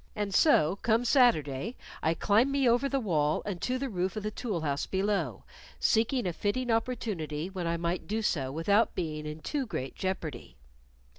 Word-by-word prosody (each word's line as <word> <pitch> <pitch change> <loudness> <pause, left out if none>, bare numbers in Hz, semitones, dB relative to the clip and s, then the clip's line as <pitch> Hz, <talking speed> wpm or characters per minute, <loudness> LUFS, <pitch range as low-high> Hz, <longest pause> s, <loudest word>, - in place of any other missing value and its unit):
And 205 -2 -2
so 185 - +4
come 230 +3 +1
Saturday, 225 - +3 0.3
I 160 +1 +1
climb 220 +9 +3
me 275 -2 +2
over 245 +4 +3
the 275 - +1
wall 155 - +1
and 190 -4 -4
to 255 +1 0
the 270 +1 -2
roof 185 -4 -2
of 215 - -4
the 215 - -2
tool 210 -6 -3
house 145 -2 -1
below, 190 - -1 0.4
seeking 230 +2 +2
a 180 - -1
fitting 235 +7 -1
opportunity 190 -9 -2
when 180 -3 -3
I 170 0 0
might 170 +3 -2
so 150 -10 +1
do 130 - -5
without 200 +9 +2
being 155 -3 -3
in 150 +1 -7
too 280 - -2
great 135 -10 -4
jeopardy. 165 -9 -4
195 Hz, 180 wpm, -29 LUFS, 160-230 Hz, 0.4 s, so